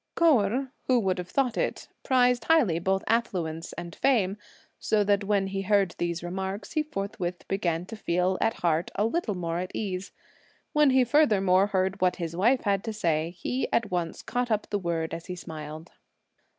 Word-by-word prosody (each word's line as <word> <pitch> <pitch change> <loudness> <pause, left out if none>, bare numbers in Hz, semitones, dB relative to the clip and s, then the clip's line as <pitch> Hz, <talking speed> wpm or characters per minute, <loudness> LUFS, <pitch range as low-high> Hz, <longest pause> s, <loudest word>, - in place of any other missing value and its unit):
Kou 325 -7 +5
Erh, 250 +7 -1 0.2
who 255 -2 +4
would 190 -4 0
have 180 0 -6
thought 260 -4 +1
it, - - -2
prized 250 -3 +3
highly 245 - +3
both 190 +3 0
affluence 175 -8 -1
and 170 -1 -7
fame, 210 -8 +2 0.4
so 210 -1 +2
that 200 0 +1
when 200 -1 +2
he 195 0 -3
heard 195 -2 +2
these 170 0 -2
remarks, 190 +3 -4
he 310 - +1
forthwith 195 -10 -4
began 175 -3 -1
to 225 - -8
feel 180 -2 0
at 225 - +2
heart 165 0 +1
a 205 - +1
little 230 - -1
more 170 -1 -2
at 185 +1 -3
ease. 195 -2 -3 0.6
When 300 -1 +5
he 260 -1 +5
furthermore 205 -9 +4
heard 190 -1 -1
what 180 -1 +3
his 170 -2 -4
wife 235 +8 +3
had 200 -1 0
to 220 - -3
say, 165 -6 0
he 250 +8 -2
at 215 -4 +1
once 175 -2 -2
caught 245 0 -2
up 215 -2 -1
the 205 - 0
word 165 -3 -2
as 165 +1 -6
he 180 - -4
smiled. 160 -1 -8
195 Hz, 190 wpm, -27 LUFS, 175-225 Hz, 0.6 s, Kou